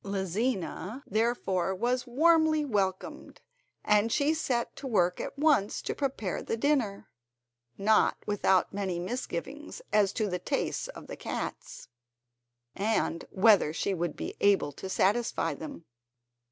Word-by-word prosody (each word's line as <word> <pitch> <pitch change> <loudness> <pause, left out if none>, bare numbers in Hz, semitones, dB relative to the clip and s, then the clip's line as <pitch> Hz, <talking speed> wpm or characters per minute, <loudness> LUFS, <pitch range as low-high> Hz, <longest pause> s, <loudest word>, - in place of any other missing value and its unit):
Lizina 200 - -2
therefore 195 -4 0
was 245 +5 -1
warmly 315 +3 +4
welcomed, 195 -7 -2 0.5
and 210 +2 +3
she 290 +5 +2
set 255 -7 -1
to 275 - -6
work 180 -7 +1
at - - -6
once 285 -9 +2
to - - -2
prepare 260 - -2
the 225 - -3
dinner, 235 -7 0 0.7
not 215 +2 +3
without 195 -3 +2
many 195 -3 -2
misgivings 245 - -5
as 205 -2 +4
to 215 -3 0
the 180 -2 -2
tastes - - -2
of - - -10
the - - -7
cats, - - -6 0.9
and 205 -5 0
whether 200 -5 +4
she 195 - -1
would 170 -3 -2
be - - -5
able 195 -7 +3
to 190 +7 -8
satisfy 195 -4 +1
them. 160 +2 -9
210 Hz, 130 wpm, -29 LUFS, 190-250 Hz, 0.9 s, warmly